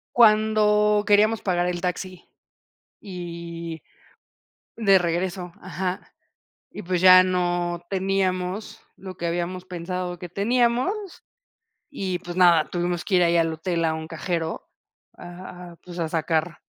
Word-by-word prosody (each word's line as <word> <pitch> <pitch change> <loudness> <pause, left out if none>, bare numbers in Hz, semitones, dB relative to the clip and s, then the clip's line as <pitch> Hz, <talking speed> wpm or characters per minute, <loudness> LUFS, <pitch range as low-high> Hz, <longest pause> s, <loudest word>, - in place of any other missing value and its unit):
Cuando 215 -2 +4
queríamos 215 +2 +3
pagar 175 -2 0
el 175 -1 -2
taxi 185 0 -5 0.7
y 170 -3 -7 0.9
de 200 -4 +5
regreso, 175 +1 -2
ajá, 185 0 -5 0.6
y - - -8
pues 180 0 -1
ya 185 0 +9
no 175 -1 -1
teníamos 190 0 -2
lo 190 -1 -9
que 170 - -3
habíamos 175 +2 -3
pensado 180 0 -5
que 180 - -8
teníamos, 245 - 0 0.7
y 190 -10 -3
pues 175 +1 -8
nada, 175 -4 +5
tuvimos 175 0 -2
que 195 - 0
ir 180 - +5
ahí 170 0 +3
al 165 -1 +1
hotel, 165 +1 -1
a 160 - +1
un 160 0 -6
cajero 165 0 -4 0.5
a 175 0 -10
pues 175 -1 -9
a 165 - 0
sacar. 160 +1 -1
180 Hz, 130 wpm, -24 LUFS, 170-195 Hz, 0.9 s, ya